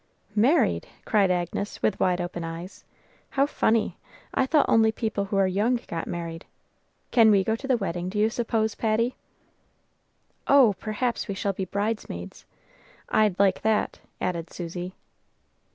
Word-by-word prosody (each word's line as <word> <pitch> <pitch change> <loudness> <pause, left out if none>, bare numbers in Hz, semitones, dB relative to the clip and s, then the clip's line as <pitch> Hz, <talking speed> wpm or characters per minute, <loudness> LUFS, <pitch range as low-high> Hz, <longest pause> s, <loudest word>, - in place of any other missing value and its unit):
"Married!" 250 +11 +3 0.2
cried 205 -4 +3
Agnes, 180 +3 -2
with 200 - +1
wide 180 -1 +2
open 175 -1 -4
eyes. 165 +3 -7 0.5
"How 275 0 +2
funny! 225 -6 +1 0.3
I 265 - +2
thought 295 +1 +4
only 220 -1 +4
people 220 -3 -2
who 195 0 -2
are 195 - +4
young 210 +7 +1
got 165 - -4
married. 165 -1 -5 0.7
Can 225 -3 +6
we 200 -2 +5
go 220 +3 0
to 270 +4 -7
the 260 -3 +3
wedding, 180 -3 -3
do 205 - -5
you 215 +2 +3
suppose, 225 -2 0
Patty?" 230 +3 0 1.3
"Oh, 270 -7 +6
perhaps 230 +3 -2
we 200 - -3
shall 195 +1 -1
be 190 0 -3
bridesmaids! 200 - -4 0.6
I'd 210 -4 +3
like 200 -1 +3
that," 220 0 0 0.2
added 170 -2 -3
Susy. 175 +1 -6
205 Hz, 150 wpm, -26 LUFS, 180-225 Hz, 1.3 s, Can